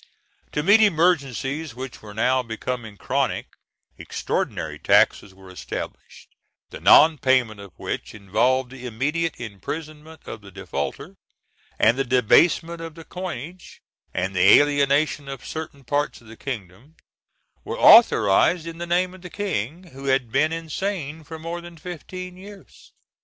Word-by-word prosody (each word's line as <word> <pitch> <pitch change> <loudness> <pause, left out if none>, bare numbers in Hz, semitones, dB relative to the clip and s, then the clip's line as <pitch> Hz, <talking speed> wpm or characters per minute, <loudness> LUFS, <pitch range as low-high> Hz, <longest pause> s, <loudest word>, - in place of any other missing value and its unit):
To 150 - -1
meet 205 +6 +6
emergencies, 160 - +1
which 130 0 -8
were 105 -1 -11
now 130 +4 +2
becoming 115 -2 -5
chronic, - - -1 0.5
extraordinary - - -3
taxes 100 - +3
were 95 -1 -14
established, 90 - -8 0.4
the - - -8
non 155 -1 +6
payment 125 -5 +2
of 100 -2 -11
which - - -5
involved 120 +6 +1
the 125 -1 -8
immediate 150 +8 -2
imprisonment 150 - -7
of - - -8
the 100 - -13
defaulter; 85 -8 -5 0.6
and 115 +4 +3
the - - +3
debasement 165 +7 +3
of 165 -1 -8
the 165 - -10
coinage, 180 -1 -8 0.3
and 95 +1 -3
the 90 - +7
alienation 145 0 +1
of 135 -2 -8
certain 155 -3 -7
parts 145 +4 -1
of 115 - -21
the 110 +1 -12
kingdom, 115 - -8 0.7
were - - -5
authorised 165 - +6
in 165 0 -8
the 175 - -4
name 180 +1 +1
of 185 - -13
the 180 - -9
King, 175 - -3
who 135 +1 -10
had 130 -4 +1
been 150 +6 +2
insane 165 -1 -4
for 160 +2 -9
more 165 +2 -5
than 170 -1 -12
fifteen 180 +2 -8
years. 200 +1 -14
145 Hz, 145 wpm, -23 LUFS, 115-165 Hz, 0.7 s, the